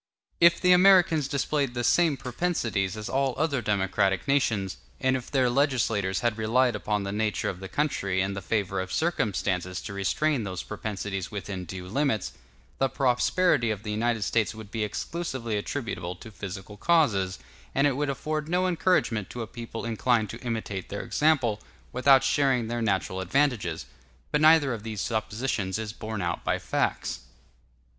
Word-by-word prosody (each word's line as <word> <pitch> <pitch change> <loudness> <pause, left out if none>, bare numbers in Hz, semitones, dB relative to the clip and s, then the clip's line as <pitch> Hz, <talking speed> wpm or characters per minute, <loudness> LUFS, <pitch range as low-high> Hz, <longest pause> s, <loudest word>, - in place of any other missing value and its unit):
If 170 0 +6
the 180 - +4
Americans 180 -5 +6
displayed 140 -1 -1
the 120 - -1
same 160 +2 +3
propensities 120 - -1
as 105 - -5
all 135 -1 0
other 145 -5 0
democratic 95 0 +1
nations, 110 -9 +1 0.2
and 130 0 +2
if 125 -2 -5
their 130 -3 +2
legislators 120 -8 +1
had 115 -2 0
relied 120 +2 +2
upon 105 -1 -1
the 100 - -3
nature 105 +1 -1
of 90 - -6
the 95 0 -7
country 100 -9 0
and 95 +1 0
the 100 - -4
favor 100 -1 -1
of 95 0 -6
circumstances 95 - -1
to 100 - -6
restrain 120 +7 0
those 95 -3 -4
propensities 105 -3 -4
within 100 -3 -5
due 90 +1 -7
limits, 115 -1 0 0.5
the 135 - +2
prosperity 135 +1 +2
of 105 -1 -3
the 105 - -4
United 115 0 0
States 110 0 0
would 110 -2 -10
be 110 -1 -1
exclusively 120 +1 -3
attributable 105 -5 -3
to 110 +5 -12
physical 100 0 -8
causes, 105 - +2 0.4
and 140 - +3
it 140 -3 +2
would 145 +1 -1
afford 155 +3 -3
no 180 +2 +2
encouragement 170 - +1
to 120 - -5
a - - -4
people 115 0 -7
inclined 115 -1 +1
to 115 - -9
imitate 110 -6 -4
their 100 - -4
example, 130 -9 +1 0.3
without 135 +1 +5
sharing 135 -3 +2
their 120 0 -2
natural 95 -3 0
advantages. 100 - 0 0.5
But 150 - +2
neither 155 -4 +6
of 115 - -5
these 110 -1 -5
suppositions 110 -2 -2
is 110 -1 -4
borne 110 -3 -5
out 85 - -2
by - - +1
facts. - - -1
115 Hz, 165 wpm, -27 LUFS, 100-140 Hz, 0.5 s, If